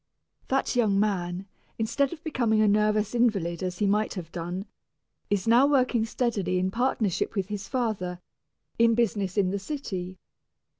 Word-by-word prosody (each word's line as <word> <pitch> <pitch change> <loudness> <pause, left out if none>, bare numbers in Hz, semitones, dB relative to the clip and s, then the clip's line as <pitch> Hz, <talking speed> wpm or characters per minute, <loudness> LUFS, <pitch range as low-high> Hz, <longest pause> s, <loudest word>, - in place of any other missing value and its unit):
That 270 -1 0
young 210 -5 +3
man, 185 -3 -1 0.3
instead 230 +5 0
of 330 -1 -9
becoming 235 -8 +1
a 215 - +4
nervous 210 +1 +2
invalid 200 -9 +1
as 180 -1 -3
he 205 - +1
might 210 +2 +1
have 170 -4 -7
done, 175 +3 -4 0.6
is 205 0 0
now 240 +4 +6
working 255 -5 +2
steadily 215 -6 -1
in 185 +1 0
partnership 225 -4 0
with 195 -1 -1
his 200 -1 -5
father, 200 -8 -2 0.6
in 230 0 +5
business 205 -4 0
in 190 -2 +3
the 200 - -2
city. 190 -7 -5
210 Hz, 155 wpm, -27 LUFS, 185-235 Hz, 0.6 s, now